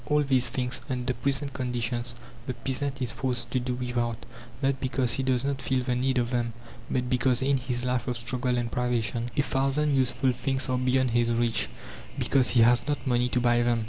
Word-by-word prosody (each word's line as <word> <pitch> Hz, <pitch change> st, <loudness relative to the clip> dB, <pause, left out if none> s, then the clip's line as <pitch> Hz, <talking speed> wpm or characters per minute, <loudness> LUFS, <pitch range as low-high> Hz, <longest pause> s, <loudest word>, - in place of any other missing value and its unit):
All 150 Hz, 0 st, +3 dB
these 130 Hz, -3 st, +3 dB
things, 125 Hz, 0 st, -2 dB
under 125 Hz, 0 st, -1 dB
present 140 Hz, +3 st, -1 dB
conditions, 125 Hz, -1 st, -2 dB, 0.3 s
the 130 Hz, -, -3 dB
peasant 135 Hz, +2 st, -2 dB
is 125 Hz, -, +1 dB
forced 125 Hz, -2 st, -2 dB
to 130 Hz, -, +1 dB
do 125 Hz, 0 st, -2 dB
without, 120 Hz, -2 st, -2 dB, 0.4 s
not 135 Hz, -1 st, 0 dB
because 130 Hz, -3 st, 0 dB
he 135 Hz, -, +1 dB
does 130 Hz, -1 st, +1 dB
not 140 Hz, -1 st, -2 dB
feel 130 Hz, -1 st, 0 dB
the 125 Hz, -, -1 dB
need 130 Hz, +1 st, 0 dB
of 120 Hz, 0 st, 0 dB
them, 120 Hz, -2 st, -1 dB, 0.4 s
but 125 Hz, -1 st, -1 dB
because, 125 Hz, 0 st, +1 dB
in 140 Hz, 0 st, +2 dB
his 125 Hz, -1 st, -3 dB
life 125 Hz, -1 st, -1 dB
of 125 Hz, -2 st, -1 dB
struggle 125 Hz, +1 st, -1 dB
and 120 Hz, -1 st, -2 dB
privation, 120 Hz, -1 st, -1 dB
a 145 Hz, -, +4 dB
thousand 135 Hz, +2 st, +1 dB
useful 130 Hz, 0 st, +2 dB
things 130 Hz, +3 st, -1 dB
are 125 Hz, 0 st, +1 dB
beyond 130 Hz, 0 st, +2 dB
his 120 Hz, 0 st, +2 dB
reach; 115 Hz, 0 st, +1 dB, 0.5 s
because 130 Hz, -3 st, +3 dB
he 120 Hz, -, +5 dB
has 120 Hz, +3 st, +4 dB
not 145 Hz, -4 st, -2 dB
money 125 Hz, -1 st, +1 dB
to 125 Hz, -, +1 dB
buy 120 Hz, 0 st, +3 dB
them. 120 Hz, -1 st, +2 dB
125 Hz, 205 wpm, -27 LUFS, 120-130 Hz, 0.5 s, he